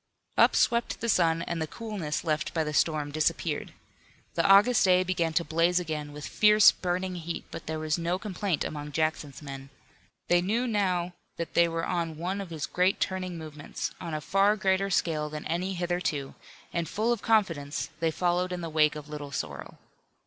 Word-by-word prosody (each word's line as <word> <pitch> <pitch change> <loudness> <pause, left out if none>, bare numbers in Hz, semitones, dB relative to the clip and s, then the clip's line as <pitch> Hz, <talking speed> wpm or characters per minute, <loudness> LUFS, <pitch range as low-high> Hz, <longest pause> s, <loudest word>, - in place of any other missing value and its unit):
Up - - +5
swept 235 -1 +2
the 230 - -3
sun 165 -5 +3
and 170 -1 -3
the 160 - -1
coolness 195 -5 -4
left 155 -1 -1
by 160 - +2
the 150 0 -4
storm 150 -1 +1
disappeared. 155 +1 -1 0.6
The - - +1
August 205 +5 +6
day 185 -1 +5
began 175 -3 0
to 170 - +2
blaze 165 +3 +2
again 155 -4 -4
with 150 0 -8
fierce 210 -1 +6
burning 185 +1 -2
heat, 170 0 -5
but - - -8
there 160 0 -2
was 155 +1 -1
no 170 +2 0
complaint 190 -4 -2
among 150 -1 -5
Jackson's 155 -3 -2
men. 135 -1 -8 0.6
They 175 0 +4
knew 220 +7 0
now 185 -6 0 0.2
that 170 - -4
they 170 0 +5
were 165 0 -2
on 165 -3 -2
one 185 +5 -2
of 195 - -7
his 160 -3 -3
great 180 +2 +1
turning 185 -2 -2
movements, 150 -2 -6
on 165 -2 -4
a 155 - -3
far 195 +5 +3
greater 195 -1 +1
scale 155 -5 0
than 150 0 -6
any 180 +4 -2
hitherto, 175 -6 -2 0.4
and 170 -1 -1
full 220 +3 +1
of 235 - -5
confidence, 165 -10 0
they 165 0 +2
followed 180 +2 0
in 180 -1 -3
the 165 - -4
wake 155 -1 +3
of 150 -1 -8
Little 150 -1 -7
Sorrel. 75 - -5
170 Hz, 190 wpm, -28 LUFS, 155-185 Hz, 0.6 s, August